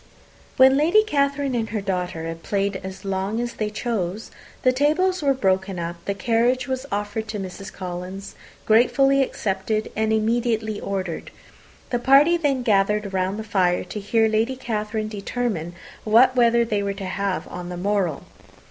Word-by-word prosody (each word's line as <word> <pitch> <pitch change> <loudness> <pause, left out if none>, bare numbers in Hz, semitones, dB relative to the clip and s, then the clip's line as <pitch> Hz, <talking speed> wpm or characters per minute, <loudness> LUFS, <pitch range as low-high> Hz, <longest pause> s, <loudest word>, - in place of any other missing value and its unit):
When 265 +1 +7
Lady 345 +9 +4
Catherine 280 -6 0
and 230 -2 -1
her 220 - -2
daughter 180 -4 -3
had 165 0 -6
played 200 +1 -1
as 190 +1 -8
long 195 +3 -2
as 240 0 -3
they 215 -1 -2
chose, 210 -3 -3 0.3
the 255 - +5
tables 310 +8 +1
were 275 -2 +2
broken 190 -4 0
up, 170 0 -5
the 200 - -2
carriage 240 +5 +1
was 260 +1 -3
offered 205 +2 -3
to 210 -1 -4
Mrs. 190 +1 -7
Collins, 185 +2 -7 0.3
gratefully 270 +5 +4
accepted, 215 -3 -2
and 220 0 0
immediately 220 -1 0
ordered. 190 -4 -4 0.6
The 245 - +1
party 275 +7 +5
then 285 -6 0
gathered 210 -2 +1
round 190 +1 -1
the 220 - -4
fire 185 -4 +1
to 195 +4 -6
hear 220 +2 +2
Lady 220 +4 +1
Catherine 215 -3 -3
determine 205 -5 -3 0.3
what 240 +4 +5
weather 235 -1 +4
they 210 -3 -1
were 200 0 -2
to 195 -1 -6
have 195 0 -2
on 180 0 -7
the 180 - -5
morrow. 190 -5 -1
215 Hz, 165 wpm, -23 LUFS, 195-245 Hz, 0.6 s, When